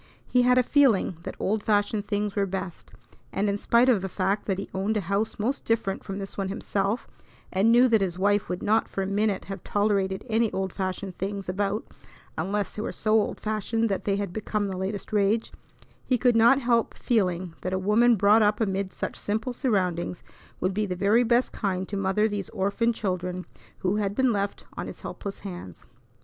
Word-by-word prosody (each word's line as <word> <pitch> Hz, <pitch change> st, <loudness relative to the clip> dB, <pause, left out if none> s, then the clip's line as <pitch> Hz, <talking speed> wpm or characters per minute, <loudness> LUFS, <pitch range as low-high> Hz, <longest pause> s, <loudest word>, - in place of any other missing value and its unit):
He 250 Hz, -, +3 dB
had 250 Hz, 0 st, +4 dB
a 255 Hz, -, +5 dB
feeling 245 Hz, -, +3 dB
that -, -, -6 dB
old 210 Hz, +2 st, 0 dB
fashioned 205 Hz, 0 st, +1 dB
things 205 Hz, -1 st, -1 dB
were 200 Hz, -1 st, +1 dB
best, 190 Hz, -2 st, -6 dB, 0.4 s
and 200 Hz, +2 st, 0 dB
in 200 Hz, -, +1 dB
spite 235 Hz, +4 st, +3 dB
of 235 Hz, -7 st, +4 dB
the 190 Hz, -, -3 dB
fact 195 Hz, +3 st, -1 dB
that 195 Hz, -2 st, 0 dB
he 195 Hz, -, -4 dB
owned 200 Hz, +3 st, 0 dB
a -, -, 0 dB
house 200 Hz, +4 st, -1 dB
most 240 Hz, +6 st, -1 dB
different 225 Hz, -4 st, -1 dB
from 195 Hz, -, -5 dB
this 195 Hz, -1 st, -6 dB
one 195 Hz, -1 st, -1 dB
himself 200 Hz, +2 st, -1 dB, 0.5 s
and 200 Hz, +4 st, +4 dB
knew 245 Hz, +2 st, +6 dB
that 225 Hz, -4 st, +3 dB
his 180 Hz, -2 st, -1 dB
wife 205 Hz, +1 st, +2 dB
would 180 Hz, +1 st, -3 dB
not 220 Hz, +2 st, +2 dB
for 195 Hz, -, -3 dB
a -, -, -2 dB
minute 200 Hz, 0 st, 0 dB
have 195 Hz, 0 st, -7 dB
tolerated 200 Hz, -2 st, 0 dB
any 225 Hz, -1 st, +2 dB
old 190 Hz, -1 st, -2 dB
fashioned 190 Hz, -1 st, -4 dB
things 195 Hz, +1 st, -3 dB
about 200 Hz, +3 st, -1 dB, 0.5 s
unless 205 Hz, +1 st, -2 dB
they 210 Hz, -, -3 dB
were -, -, -3 dB
so 215 Hz, -, -2 dB
old 220 Hz, -1 st, +2 dB
fashioned 220 Hz, +1 st, -1 dB
that 195 Hz, -, -2 dB
they 200 Hz, -, +2 dB
had 200 Hz, -3 st, -3 dB
become 210 Hz, -1 st, -2 dB
the 190 Hz, -, -4 dB
latest 195 Hz, +3 st, -4 dB
rage, 210 Hz, +2 st, +2 dB, 0.5 s
he 255 Hz, -, +1 dB
could 245 Hz, 0 st, +3 dB
not 235 Hz, +4 st, +6 dB
help 235 Hz, -3 st, +1 dB
feeling 185 Hz, -7 st, 0 dB
that 185 Hz, -, -3 dB
a 190 Hz, -, 0 dB
woman 220 Hz, +5 st, +4 dB
brought 210 Hz, +2 st, +5 dB
up 210 Hz, 0 st, +3 dB
amid 195 Hz, -3 st, -1 dB
such -, -, -4 dB
simple 220 Hz, +4 st, -2 dB
surroundings 180 Hz, -8 st, -1 dB, 0.4 s
would 185 Hz, +1 st, 0 dB
be 210 Hz, +1 st, 0 dB
the 180 Hz, -, -2 dB
very 205 Hz, +6 st, +3 dB
best 240 Hz, +2 st, +2 dB
kind 190 Hz, -3 st, -2 dB
to 200 Hz, -, -5 dB
mother 195 Hz, +2 st, +2 dB
these 205 Hz, -3 st, -4 dB
orphan 205 Hz, +3 st, 0 dB
children 180 Hz, -4 st, -3 dB, 0.4 s
who 190 Hz, +3 st, +1 dB
had 200 Hz, -1 st, -1 dB
been 260 Hz, -1 st, +3 dB
left 200 Hz, 0 st, -2 dB
on -, -, -4 dB
his -, -, -9 dB
helpless 200 Hz, -1 st, -6 dB
hands. 175 Hz, -, -8 dB
205 Hz, 205 wpm, -26 LUFS, 190-220 Hz, 0.5 s, knew